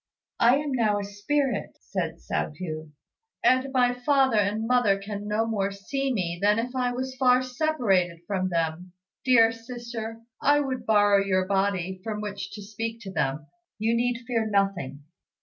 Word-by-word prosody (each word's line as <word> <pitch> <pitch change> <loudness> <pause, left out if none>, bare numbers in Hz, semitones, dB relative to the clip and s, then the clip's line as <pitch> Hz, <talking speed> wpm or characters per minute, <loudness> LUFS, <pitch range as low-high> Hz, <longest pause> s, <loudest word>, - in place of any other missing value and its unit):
"I 240 +2 +6
am 290 0 -2
now 220 -5 +2
a 205 - -2
spirit," 210 +5 -1
said 170 -4 -3
Hsiao 160 - -3
hui, 155 -3 -5 0.5
"and 260 +1 +3
my 250 -2 +3
father 265 -2 +3
and 210 +2 0
mother 235 -5 +3
can 205 +1 -6
no 215 +2 +1
more 205 -3 0
see 265 +8 -3
me 175 -7 -2
than 210 +1 +4
if 245 +3 -3
I 250 -1 +1
was 260 +1 -4
far 255 -1 +4
separated 240 - 0
from 185 -1 -1
them. 170 +1 -2 0.3
Dear 230 -3 +6
sister, 230 -1 -7 0.2
I 290 +1 +4
would 265 -3 -3
borrow 205 -2 +5
your 185 -1 +1
body, 190 -1 0
from 215 -1 -3
which 205 -1 -5
to 205 0 -8
speak 225 +2 -5
to 195 -4 -7
them. 145 -2 -1 0.3
You 220 +2 +1
need 240 0 0
fear 230 -3 0
nothing." 195 -9 -1
215 Hz, 165 wpm, -26 LUFS, 195-245 Hz, 0.5 s, I